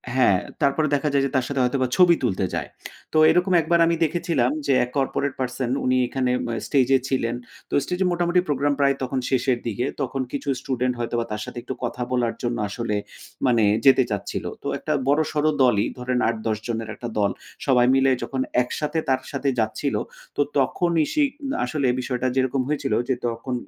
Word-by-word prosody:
হ্যাঁ 120 -8 +4 0.2
তারপরে 145 +2 +2
দেখা 145 +1 0
যায় 140 -1 +3
যে 140 - -3
তার 130 -2 +2
সাথে 140 -1 -2
হয়তোবা 130 +1 +1
ছবি 180 -2 +7
তুলতে 95 -5 0
যায়। - - -2 0.5
তো - - +2
এরকম 180 +3 +3
একবার 170 +1 +2
আমি 170 0 +2
দেখেছিলাম 160 -6 +1
যে 140 - +3
১ 125 - -12
কর্পোরেট 140 +1 0
পারসন 125 -1 -2 0.2
উনি 130 0 +3
এখানে 130 0 -1 0.2
আ - - -2
স্টেজ 135 -4 +2 0.2
ছিলেন। 120 -3 0 0.3
তো - - -9
স্টেজে 180 +5 -1
মোটামুটি 175 +1 +2
প্রোগ্রাম 145 0 +1
প্রায় 140 -1 +3 0.4
শেষের 130 -1 +1
দিকে, 120 +2 -1 0.2
তখন 135 0 -2
কিছু 140 0 -4
স্টুডেন্ট 125 -2 -1
হয়তো 120 0 -2
বা 115 - -1
তার 105 0 -3
সাথে - - -9
একটু 130 - -4
কথা 120 +1 -3
বলার 120 -2 +1
জন্য 120 0 -1
আসলে 115 0 -2 0.5
মানে 120 -3 +3 0.2
যেতে 135 -1 +7
চাচ্ছিল। 100 -1 -3 0.2
তো - - -4
একটা 155 - -2
বড় 145 +3 +4
সড় 150 0 +1
দলই 120 -6 +4
ধরেন 125 0 -1
৮-১০ 110 -1 -2
জনের 115 -2 -3
একটা 120 - -6
দল 100 -1 +2 0.3
সবাই 125 -3 +4
মিলে 135 0 +4
যখন 135 -1 -2 0.2
একসাথে 150 +6 -2
তার 130 -1 +2
সাথে 140 -1 -1
যাচ্ছিলো, 110 +6 -1 0.4
তো - - +1 0.2
তখনই 170 -3 +2
সে 305 - +2 0.4
আসলে 140 +1 -1
বিষয়টা 125 0 -2
যেরকম 130 0 +1
হয়েছিল 145 -6 -1 0.2
যে - - +4
তখন 115 +2 -4
130 Hz, 185 wpm, -23 LUFS, 120-145 Hz, 0.5 s, ছবি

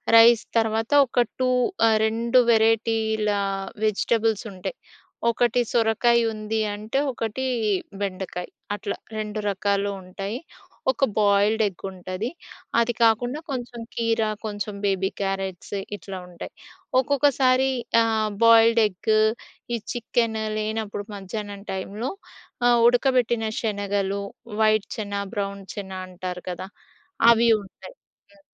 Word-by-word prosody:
Rice 230 0 +8
తర్వాత 225 +2 +1 0.2
ఒక 245 - +2 0.2
2 255 - +3 0.4
ఆహ్, 220 -1 +4
2 235 +3 +2
వెరైటీల 220 -1 +2 0.5
వెజిటబుల్స్ 220 +1 +1
ఉంటాయి. 185 - -6 0.5
ఒకటి 240 +1 +2
సొరకాయ 235 +1 +3
ఉంది 215 +1 -2
అంటే, 215 +5 -4 0.2
ఒకటి 230 +3 -3 0.6
బెండకాయ్ 185 -2 -4 0.3
అట్లా 200 0 -4 0.2
2 215 0 -3
రకాలు 200 +1 0
ఉంటాయి. 195 +6 -5 0.5
ఒక 270 - -3 0.2
బాయిల్డ్ 205 +2 +3
ఎగ్ 190 - -9
ఉంటది, 185 +3 -5 0.5
అది 235 +1 +2
కాకుండా 245 +5 +3
కొంచెం 245 -2 -5 0.2
కీర, 230 -1 +1 0.2
కొంచెం 205 -1 -4
బేబీ 190 -1 +1
క్యారట్స్ 195 -1 -3 0.2
ఇట్లా 190 0 -8
ఉంటాయి. 175 -1 -9 0.5
ఒక్కొక్కసారి 265 -1 +3 0.3
ఆహ్, 220 -1 +1 0.2
బాయిల్డ్ 230 0 +6
ఎగ్ 205 +2 -2 0.6
ఈ - - 0 0.2
చికెన్ 230 -1 0 0.2
లేనప్పుడు 215 -1 -3
మధ్యాహ్నం 200 0 -6
టైంలో 205 +7 -4 0.6
ఆహ్, 240 -1 +5
ఉడకబెట్టిన 245 -3 +2
శనగలు, 200 -2 -1 0.4
వైట్ 215 -1 +3
చెన, 205 -2 -4 0.2
బ్రౌన్ 200 -1 -3
చెన 195 -2 -6 0.2
అంటారు 180 0 -6
కదా! 180 +1 -5 0.6
అవి 235 0 +4
ఉంటాయి. 350 - -13 0.4
హ్మ్. 300 -1 -23
220 Hz, 110 wpm, -24 LUFS, 200-230 Hz, 0.6 s, Rice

